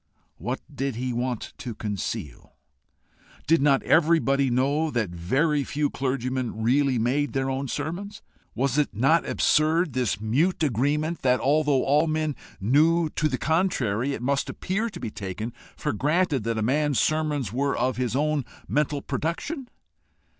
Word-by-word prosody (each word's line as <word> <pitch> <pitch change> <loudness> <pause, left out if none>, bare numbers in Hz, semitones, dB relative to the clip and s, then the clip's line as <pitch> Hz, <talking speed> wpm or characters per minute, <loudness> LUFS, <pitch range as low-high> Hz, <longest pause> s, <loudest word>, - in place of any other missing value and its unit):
What 125 - -3
did 135 -2 -2
he 125 +1 -2
want 120 -1 -3
to 120 -4 -6
conceal? 100 - -5 0.9
Did 165 0 +3
not 140 -1 +3
everybody 150 -5 +3
know 140 +6 +1
that 115 - -1
very 135 - +1
few 145 +1 -1
clergymen 130 -4 -2
really 135 +2 +3
made 130 +6 0
their 135 -1 0
own 135 +1 -2
sermons? 170 - -5 0.3
Was 135 +3 +1
it 145 - 0
not 135 +10 +3
absurd, 155 0 +2
this 125 -6 0
mute 145 - +1
agreement 150 +5 0
that, 125 -1 +3
although 145 -1 +2
all 150 +4 +3
men 155 -2 -1 0.2
knew 155 - +3
to 155 - 0
the 130 - -1
contrary, 140 - 0
it - - -7
must 140 +2 0
appear 205 +5 -2
to 185 -5 -9
be 110 - -5
taken 105 +4 -5 0.2
for - - -2
granted 150 - +1
that 115 -1 -1
a 110 - 0
man's 145 +3 +1
sermons 150 -8 0
were 140 +2 0
of 130 -1 0
his 125 -1 -1
own 150 0 +1 0.2
mental 145 -1 0
production? 245 - -3
140 Hz, 155 wpm, -25 LUFS, 125-155 Hz, 0.9 s, Did